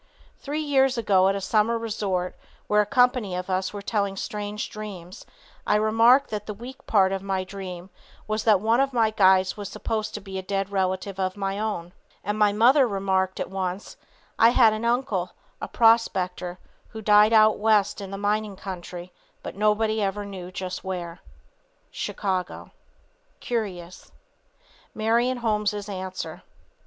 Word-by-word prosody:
Three 295 +2 -3
years 270 -3 +2
ago 195 -4 +3
at 195 - 0
a - - -2
summer 215 +4 +1
resort 200 -5 -2 0.3
where 210 0 +3
a 210 - -2
company 245 -6 +2
of 180 +1 -4
us 185 +1 -1
were 205 -1 -7
telling 200 -2 -1
strange 210 +1 -4
dreams, 195 -3 -9 0.4
I - - +3
remarked 225 +6 +4
that 210 -1 -4
the 210 - -5
weak 245 +5 -11
part 190 -3 +4
of 195 -1 -2
my 190 -1 -2
dream 185 -1 -8 0.4
was 215 0 -1
that 215 -4 +5
one 225 +4 +2
of 275 0 +1
my 225 -3 +2
guides 190 -2 +3
was 205 -1 -6
supposed 220 -1 -3
to - - -4
be 190 -1 -6
a - - -4
dead 195 +1 -3
relative 190 0 -2
of 185 +1 -2
my 195 0 -2
own, 185 -5 -3 0.3
and 205 +2 -2
my 210 -1 +4
mother 250 +6 +5
remarked 190 -2 -1
at - - -4
once, 190 0 -4 0.4
"I 225 - +7
had 235 -3 +5
an 215 +2 -4
uncle, 245 +4 0 0.3
a - - -3
prospector, 185 -6 +2 0.3
who 220 0 -9
died 210 +1 +6
out 215 -1 +5
West 210 -1 +2
in 195 - -7
the 195 - -6
mining 205 0 -1
country, 180 -2 -8 0.3
but - - -7
nobody 215 +1 +1
ever 205 +1 -2
knew 185 -3 -8
just 185 0 -5
where." 175 -2 -5 0.7
Chicago. 185 -3 -3 0.7
CURIOUS. 185 -7 -5 0.8
MARION 235 +4 +1
HOLMES' 210 -3 -1
ANSWER. 190 -2 -6
205 Hz, 160 wpm, -25 LUFS, 190-220 Hz, 0.8 s, I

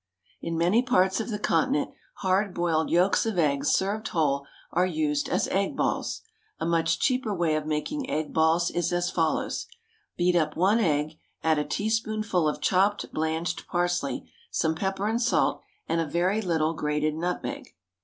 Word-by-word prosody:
In 165 0 -3
many 180 +8 +3
parts 190 -7 +2
of 225 - -3
the 210 - -2
Continent, 165 -6 +1 0.3
hard 190 +1 +1
boiled 165 -2 +1
yolks 180 +3 +3
of 220 -4 -2
eggs, 145 -3 +2
served 205 +3 0
whole, 140 -4 0 0.2
are 180 - +2
used 155 -5 0
as - - +1
egg 200 +9 0
balls. - - -1 0.4
A - - -2
much 165 -1 +2
cheaper 255 -4 +1
way 170 -3 +1
of 155 0 -2
making 260 - -2
egg 155 0 -2
balls 160 +2 +3
is 175 -2 -1
as 175 0 0
follows: 165 -2 -1 0.5
Beat 180 0 +2
up 160 -3 +1
one 195 +6 +4
egg, 155 -5 0 0.2
add 160 -2 +3
a - - +1
teaspoonful 215 -3 0
of 150 - -5
chopped 195 +2 +1
blanched 160 +2 -2
parsley, 175 0 -1 0.2
some 160 0 +1
pepper 195 +4 -2
and 230 +2 0
salt, 245 - +2 0.3
and 165 +1 +1
a 165 - -2
very 180 +7 +1
little 165 -4 +1
grated 150 0 -1
nutmeg. 180 - -4
175 Hz, 165 wpm, -27 LUFS, 160-200 Hz, 0.5 s, one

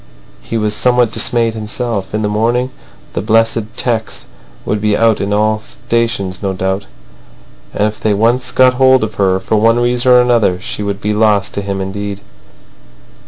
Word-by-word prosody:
He 115 - -4
was 105 -1 0
somewhat 125 0 +2
dismayed 115 0 +1
himself. 110 -2 -4
In 110 +1 -2
the - - +1
morning 120 +5 0 0.4
the - - -2
blessed 115 0 0
'tecs 115 -3 -1 0.4
will 105 - 0
be 105 0 0
out 115 -2 +2
in 100 - -2
all 110 +1 +1
the 110 - -14
stations, 115 -6 -2
no 100 -2 -2
doubt. 95 -1 -2 0.8
And 105 - 0
if 105 0 -6
they 105 -2 +1
once 120 +4 +1
got 130 -1 +4
hold 130 -1 +4
of 110 0 -3
her, 95 -1 +2
for 110 - -1
one 115 +2 +3
reason 120 +1 +2
or 125 - +7
another 120 -7 +2
she 105 - -5
would 100 -1 -3
be 105 +1 -1
lost 105 -2 +1
to 100 - -3
him 100 -1 -4
indeed. 100 +1 -5
110 Hz, 180 wpm, -14 LUFS, 100-120 Hz, 0.8 s, or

